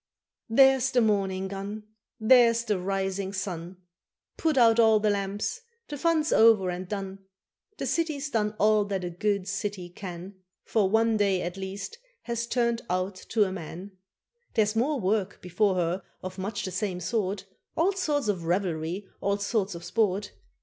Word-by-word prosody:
There's 265 +2 +5
the 255 - +2
morning 195 -4 +1
gun! 200 +2 -6 0.4
There's 230 0 +5
the 210 -5 0
rising 195 +1 -2
sun! 185 -2 -5 0.6
Put 315 -4 0
out 230 -2 +6
all 220 -2 +6
the 210 0 +2
lamps 200 - -2 0.3
the 295 - -4
fun's 315 +1 +1
over 220 -5 +5
and 180 +1 -5
done. 195 -1 -5 0.6
The - - -3
city's 300 -3 -1
done 210 -3 0
all 215 0 +4
that 195 -2 -3
a 175 - -3
good 200 +2 -1
city 200 -3 -3
can, 185 +1 -8 0.2
For 210 -4 +2
one 225 +1 +3
day, 195 -3 +2
at 175 +1 -4
least, 195 - -6 0.2
has 235 -1 -3
turned 235 -1 +1
out 185 +2 0
to 210 +3 0
a 190 - -1
man. 180 +2 -7 0.6
There's 215 -1 +2
more 270 +5 +1
work 200 -1 0
before 185 +2 +1
her 180 +1 0 0.2
of 185 +1 -6
much 205 +3 -3
the 185 - -4
same 185 0 -2
sort, 195 +1 -2 0.3
All 345 +5 +3
sorts 300 - -1
of 185 -5 -1
revelry, 175 +1 -1
all 200 0 +1
sorts 200 -2 -1
of 170 - -8
sport. 200 0 0
205 Hz, 165 wpm, -27 LUFS, 190-225 Hz, 0.6 s, out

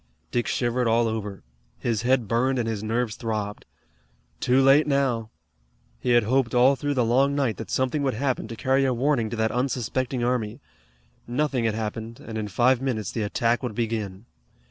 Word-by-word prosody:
Dick 120 -1 0
shivered 120 0 0
all 115 +1 +3
over. 105 -5 -4 0.3
His 115 -3 -1
head 125 -2 +2
burned 125 +4 +1
and 120 -2 -1
his 110 -3 -2
nerves 115 0 -1
throbbed. 105 -3 -4 0.7
Too 125 +2 +3
late 135 +3 +5
now! 130 -6 +1 0.7
He 125 - +1
had 120 -1 +5
hoped 125 +2 +1
all 130 +3 +5
through 145 +2 -2
the 125 -3 +2
long 135 +5 +3
night 135 -6 0
that 115 - -7
something 130 +3 0
would 135 -4 0
happen 130 -2 -1
to 115 - -7
carry 135 +3 +2
a 130 -2 +1
warning 125 -3 +1
to 120 - -4
that 110 0 0
unsuspecting 125 0 -1
army. 120 -4 -1 0.7
Nothing 130 -1 0
had 110 -1 +1
happened, 110 +1 -5
and 115 - -8
in 105 - -3
five 120 +5 +2
minutes 110 -7 -2
the 115 - -3
attack 115 +3 0
would 125 -5 -4
begin. 110 -3 -3
120 Hz, 185 wpm, -25 LUFS, 110-130 Hz, 0.7 s, late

